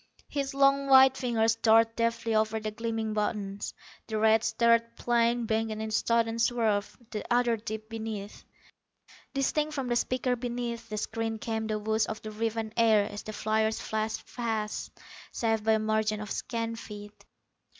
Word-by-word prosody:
His 275 -1 -3
long 275 0 +4
white 265 -1 +7
fingers 230 -4 +1
darted 225 0 +4
deftly 230 -1 0
over 220 0 +1
the 215 0 -4
gleaming 225 -1 -3
buttons. 205 -2 -2 0.3
The 220 -1 -2
red 220 +1 +4
starred 230 0 +2
plane 235 0 +1
banked 220 0 0
in 215 - -4
a 220 0 -4
sudden 230 +1 +1
swerve; 225 -4 +1
the 210 - -4
other 240 -1 +3
dipped 220 0 -6
beneath. 220 -2 -6 0.9
Distinct 300 +3 0
from 265 -3 -2
the 240 - +1
speaker 250 +1 0
beneath 235 -1 -4
the 215 - -4
screen 225 +1 -2
came 220 0 -3
the 215 -1 -1
whoosh 220 0 0
of 220 - -4
the 215 - -6
riven 220 0 -2
air 220 -3 +5
as 205 - -6
the 215 - -7
fliers 220 +1 0
flashed 220 0 -3
past, 220 -3 -2 0.4
safe 225 -2 0
by 220 0 +4
a - - +4
margin 215 0 0
of 210 -1 -6
scant 230 -1 -3
feet. 205 -1 -10
225 Hz, 165 wpm, -29 LUFS, 215-235 Hz, 0.9 s, white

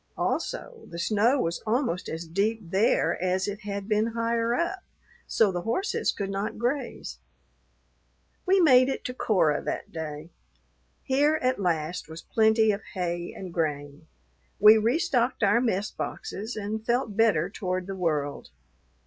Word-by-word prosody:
Also, 475 -2 -3
the 170 - -9
snow 220 +9 +2
was 170 -6 -1
almost 220 -6 0
as 165 +1 -5
deep 200 +7 0
there 195 -1 +2
as 185 +1 0
it 205 0 -4
had 200 -1 -5
been 215 0 +2
higher 230 0 +1
up, 350 +6 -1 0.5
so 215 -4 +3
the 175 -1 -3
horses 300 - 0
could 195 -1 -4
not 195 +2 -3
graze. 245 +5 -3 1.3
We 385 +1 +5
made 255 -6 +6
it 270 - -4
to 250 - -3
Cora 180 - +2
that - - -4
day. 160 0 -6 0.7
Here 290 +3 +3
at 255 -4 +1
last 165 -2 -1
was 160 +1 -9
plenty 220 0 +3
of 200 +1 -3
hay 175 -1 -2
and 185 -3 -7
grain; 145 -3 -3 0.5
we 215 +2 +9
restocked 245 +1 +1
our 205 +4 +4
mess 210 -4 0
boxes 215 +5 -5
and 215 +1 -4
felt 235 -2 0
better 205 -7 +3
toward 185 -3 -3
the 195 +1 -5
world. 150 -6 -2
210 Hz, 150 wpm, -27 LUFS, 175-235 Hz, 1.3 s, we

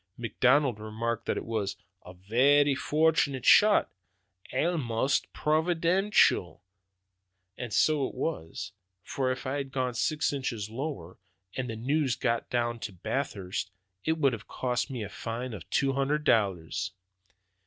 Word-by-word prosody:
McDonald 125 +1 +2
remarked 115 +2 -3
that - - 0
it - - -4
was 110 -4 -2 0.3
'a 90 - -12
varra 135 +10 +3
fortunate 145 -3 +1
shot, 210 0 +6 0.6
almaist 135 -4 0
providaintial!' 170 - +2 0.9
And 120 0 -6
so 150 +3 +3
it - - -10
was; 110 - -4 0.3
for 130 -2 -1
if 130 +2 -5
it - - -2
had 140 -1 -3
gone 130 -2 -1
six 150 +5 0
inches 115 -6 -3
lower, 115 - -5 0.4
and 130 -2 -3
the 115 - -4
news 135 +2 0
gotten 115 +1 -1
out 120 -1 -2
at 90 -3 -19
Bathurst, 100 -9 -3 0.3
it 160 - +2
would 140 -5 +3
have 115 -1 -7
cost 125 +1 -2
me 125 -5 -4
a - - -4
fine 115 +5 -5
of 95 -6 -9
two 135 -1 +1
hundred 140 +3 0
dollars." 95 - +1
130 Hz, 140 wpm, -29 LUFS, 110-145 Hz, 0.9 s, shot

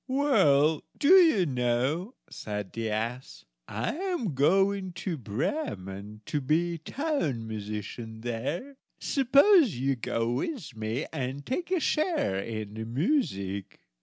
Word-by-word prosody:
"Well, 160 - +3 0.2
do 285 - +2
you 335 - +7
know," 130 - 0
said 105 -2 -6
the 115 -1 -2
ass, 115 +4 -4 0.2
"I 110 - -2
am 350 - -2
going 190 +6 +2
to 175 0 -3
Bremen, 105 - -4
to 150 - -2
be 165 +5 +1
town 160 - -2
musician 110 +1 -6
there; 140 - -4 0.2
suppose 280 - +5
you 135 +2 0
go 115 0 -1
with 170 - -3
me 110 +5 -2
and 135 -1 -4
take 345 +8 -3
a 370 -1 +2
share 310 - +1
in 110 0 -5
the 110 0 -5
music. 115 - -1
140 Hz, 125 wpm, -28 LUFS, -, 0.2 s, you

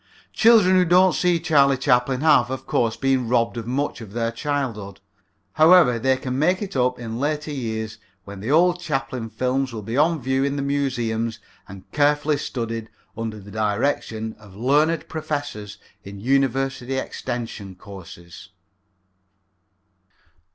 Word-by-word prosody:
Children 220 -5 +5
who 180 - +4
don't 180 +2 +5
see 175 -2 +2
Charlie 140 -5 +3
Chaplin 125 0 +1
have, 150 -6 +4
of 130 0 -5
course, 115 -2 0
been 135 -3 0
robbed 115 -1 +1
of 115 -1 -6
much 130 0 -2
of 105 -3 -10
their 115 0 -1
childhood. 115 -8 -4 0.5
However, 155 -7 +5
they 130 +2 +2
can 130 0 -4
make 180 +6 +2
it 195 - -7
up 125 -1 +1
in 115 -1 -6
later 150 +2 -2
years 110 -5 -4 0.3
when 100 -1 -9
the 110 +5 -5
old 175 +4 +4
Chaplin 135 -8 -3
films 130 +2 -1
will 110 -2 -6
be 115 +4 -4
on 160 +2 +3
view 130 +1 0
in 140 0 -1
the 140 - -2
museums 120 -5 -1 0.3
and 95 -1 -11
carefully 145 0 +2
studied 115 -4 -4 0.3
under 110 -1 -5
the 100 +1 -13
direction 110 +1 -1
of 100 -3 -16
learned 150 +8 +1
professors 145 -10 -5 0.3
in 100 0 -9
university 135 +1 0
extension 115 -7 -5
courses. 90 -3 -12
130 Hz, 145 wpm, -22 LUFS, 115-145 Hz, 0.5 s, Children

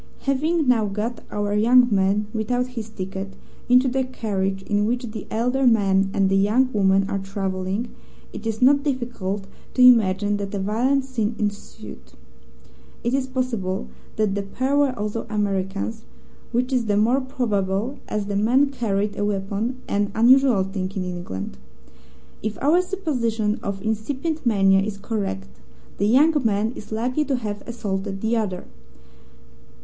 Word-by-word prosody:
"Having 305 +3 +1
now 235 -4 +4
got 215 +4 -3
our 205 0 -2
young 240 +4 +5
man, 200 +1 +2
without 245 +3 -1
his 225 -3 -6
ticket, 195 -1 -6 0.3
into 250 +1 +5
the 265 +1 +1
carriage 195 -6 -2
in 205 +1 0
which 245 +2 -1
the 215 -2 -7
elder 250 +4 +1
man 195 -4 +3
and 195 -1 +2
the 195 - +2
young 225 +7 +3
woman 195 -1 +3
are 200 -1 -2
travelling, 195 +2 -3 0.5
it 220 - -6
is 225 +2 -1
not 280 +2 +6
difficult 240 -8 -3 0.3
to 255 - +5
imagine 205 -4 +5
that 200 0 -4
a - - -1
violent 240 +8 +1
scene 235 -4 -2
ensued. 205 -2 -6 0.9
It 235 - 0
is 265 -1 0
possible 230 -8 -2 0.3
that 215 -2 +1
the 200 - -1
pair 260 +8 -1
were 280 -3 +2
also 210 +2 -3
Americans, 205 +1 -2 0.5
which 250 +2 0
is 245 -2 +1
the 205 -1 +2
more 240 +6 +3
probable 225 -2 -1
as 210 -1 -2
the 200 0 -3
man 255 +7 +3
carried 205 -5 -1
a - - 0
weapon 205 +5 -2
an 205 0 0
unusual 245 -2 +5
thing 190 -1 -4
in 190 -2 -2
England. 100 - -6 0.8
If 215 0 -3
our 315 +6 +4
supposition 245 - -1
of 200 -4 -4
incipient 260 +8 -2
mania 195 -3 +4
is 200 0 -3
correct, 200 - -3 0.5
the 200 - +2
young 285 +8 +5
man 215 0 +1
is 210 - -10
likely 250 +7 0
to 275 - 0
have 210 -4 -4
assaulted 195 -4 -4
the 225 +1 +1
other. 200 -5 -2
215 Hz, 155 wpm, -23 LUFS, 195-250 Hz, 0.9 s, not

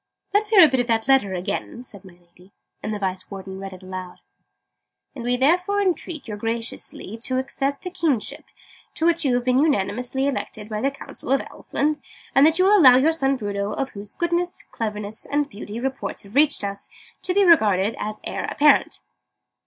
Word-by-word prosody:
"Let's 420 +1 +2
hear 425 -4 +7
that 320 - +7
bit 260 - +1
of 245 - 0
the 225 +2 +1
letter 205 -8 +3
again," 200 +6 -4
said 205 -5 -7
my 190 -2 -14
Lady. 175 +2 -23 0.3
And 215 - -4
the 210 - -2
Vice 190 -2 -3
Warden 190 -1 -8
read 195 -1 -8
aloud: 185 -1 -7 0.5
" - - -58
and 245 - -6
we 245 +1 +1
therefore 360 +9 +2
entreat 350 -6 -2
you 210 - -4
graciously 225 -1 -4
to 255 +2 +1
accept 275 +1 -2
the 360 - -5
Kingship, 295 - -1 0.5
to 320 - 0
which 335 0 +3
you 260 -4 +2
have 245 - 0
been 255 0 +3
unanimously 265 -1 0
elected 225 -6 -4
by 215 -1 -3
the 275 - +2
Council 275 -2 -7
of 275 - +3
Elfland: 300 +1 -2 0.3
and 275 +3 +6
that 320 +1 +2
you 370 - +4
will 410 +1 +6
allow 255 -6 +8
your 295 +5 +4
son 275 -4 +1
Bruno 205 -3 -3
of 270 +4 -2
whose 200 0 -6
goodness, 345 +1 -1
cleverness, 210 -1 -4
and 290 0 0
beauty, 210 +2 -7
reports 265 +2 -4
have 200 +1 -15
reached 290 -1 +3
us 200 0 -5 0.3
to 365 - -1
be 400 -1 +5
regarded 215 - +4
as 215 0 -4
Heir - - -3
Apparent." 290 -1 +3
250 Hz, 195 wpm, -23 LUFS, 205-295 Hz, 0.5 s, allow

